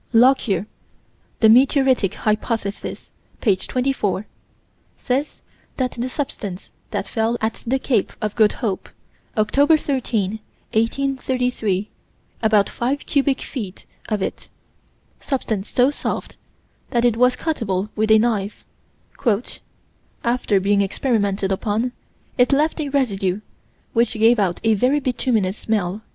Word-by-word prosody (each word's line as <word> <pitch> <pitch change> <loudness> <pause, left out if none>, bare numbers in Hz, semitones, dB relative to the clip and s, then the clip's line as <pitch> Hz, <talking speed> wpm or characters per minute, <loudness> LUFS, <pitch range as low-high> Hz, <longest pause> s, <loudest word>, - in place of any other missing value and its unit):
Lockyer 230 -6 +4 0.8
(The 220 - +7
Meteoric 260 -3 +4
Hypothesis, 215 -1 -2 0.3
p. 205 -5 +3
24) 230 -2 -1 0.7
says 270 +3 -2 0.3
that 255 -2 0
the 245 +2 -3
substance 205 -9 -5 0.2
that - - -3
fell 230 0 0
at 220 +1 -2
the 260 +3 +2
Cape 245 -6 0
of 215 -1 -3
Good 215 -2 +4
Hope, 210 -6 -2 0.5
Oct. 285 +9 +4
13, 220 -8 -1 0.3
1838 250 -4 0 0.5
about 215 -3 +4
five 270 +4 -2
cubic 280 -2 +1
feet 205 -8 -6 0.2
of 210 -3 0
it: - - -5 0.7
substance 220 -7 -2
so 255 +3 +3
soft - - -4 0.5
that 240 -1 +1
it 240 -2 +3
was 250 +2 +4
cuttable 210 - -2
with 220 0 +1
a 220 - +7
knife 215 -3 -1 1.6
"after 235 -4 +2
being 200 +1 +2
experimented 200 -2 0
upon, 215 +5 0 0.5
it 245 - +5
left 305 +3 +2
a 290 - -2
residue, 205 -8 0 0.5
which 235 0 +2
gave 225 +1 +4
out 185 -4 +1
a 225 -1 +4
very 255 +8 +2
bituminous 230 -7 0
smell." 205 -2 -1
225 Hz, 120 wpm, -21 LUFS, 205-255 Hz, 1.6 s, The